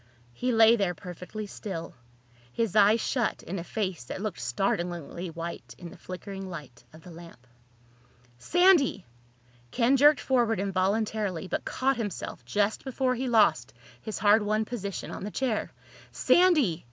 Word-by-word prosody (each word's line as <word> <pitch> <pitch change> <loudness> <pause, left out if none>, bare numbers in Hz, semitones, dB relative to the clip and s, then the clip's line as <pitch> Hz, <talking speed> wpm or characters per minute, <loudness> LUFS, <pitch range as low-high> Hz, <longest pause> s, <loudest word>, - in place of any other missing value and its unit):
He 250 - -1
lay 225 0 +6
there 190 -4 0
perfectly 180 +4 -8
still, 185 -4 -7 0.6
his 225 - -2
eyes 210 +2 +5
shut 240 0 -1
in 190 +3 -5
a - - -5
face 185 - -3
that - - -6
looked 215 0 -4
startlingly 175 - -2
white 170 +1 -7
in 170 -2 -9
the - - -12
flickering 190 +1 -7
light 145 -9 -10
of 160 +1 -16
the 180 - -12
lamp. 165 -7 -13 0.9
"Sandy!" 350 - +3 0.6
Ken 250 - +2
jerked 295 +2 +6
forward 235 -5 +1
involuntarily 195 -1 -1
but - - -3
caught 270 0 0
himself 205 - -5
just 205 - 0
before 260 -1 0
he 255 +1 -3
lost 160 - +3 0.3
his 220 - -5
hard 210 +1 +4
won 215 +1 0
position 200 -5 -5
on - - -7
the 205 - -4
chair. 235 -1 -2 0.4
"Sandy!" 305 - +3
205 Hz, 150 wpm, -27 LUFS, 175-230 Hz, 0.9 s, lay